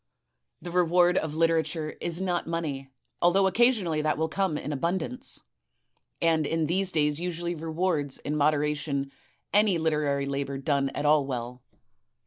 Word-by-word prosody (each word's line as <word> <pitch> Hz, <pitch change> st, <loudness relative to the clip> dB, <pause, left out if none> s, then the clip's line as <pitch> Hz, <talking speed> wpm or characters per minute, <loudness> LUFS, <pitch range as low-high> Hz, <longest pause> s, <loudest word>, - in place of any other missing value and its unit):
The 175 Hz, -, -6 dB
reward 180 Hz, 0 st, +4 dB
of 155 Hz, -1 st, -4 dB
literature 160 Hz, -1 st, +1 dB
is 170 Hz, +2 st, -2 dB
not 180 Hz, -3 st, -1 dB
money, 150 Hz, -5 st, -3 dB, 0.3 s
although 185 Hz, +3 st, +4 dB
occasionally 190 Hz, -6 st, +2 dB
that 155 Hz, 0 st, 0 dB
will 160 Hz, +1 st, 0 dB
come 190 Hz, -3 st, 0 dB
in 150 Hz, -, -4 dB
abundance, 180 Hz, -, -3 dB, 0.8 s
and 160 Hz, -3 st, +2 dB
in 165 Hz, -1 st, 0 dB
these 185 Hz, +4 st, 0 dB
days 150 Hz, -2 st, +1 dB
usually 175 Hz, 0 st, -2 dB
rewards 160 Hz, -3 st, -1 dB
in 150 Hz, -, -4 dB
moderation 145 Hz, -2 st, 0 dB, 0.4 s
any 205 Hz, -3 st, +4 dB
literary 150 Hz, -3 st, 0 dB
labor 140 Hz, 0 st, -3 dB
done 140 Hz, 0 st, 0 dB
at 150 Hz, -, -2 dB
all 145 Hz, -2 st, +4 dB
well. 125 Hz, -1 st, -5 dB
160 Hz, 140 wpm, -27 LUFS, 145-175 Hz, 0.8 s, reward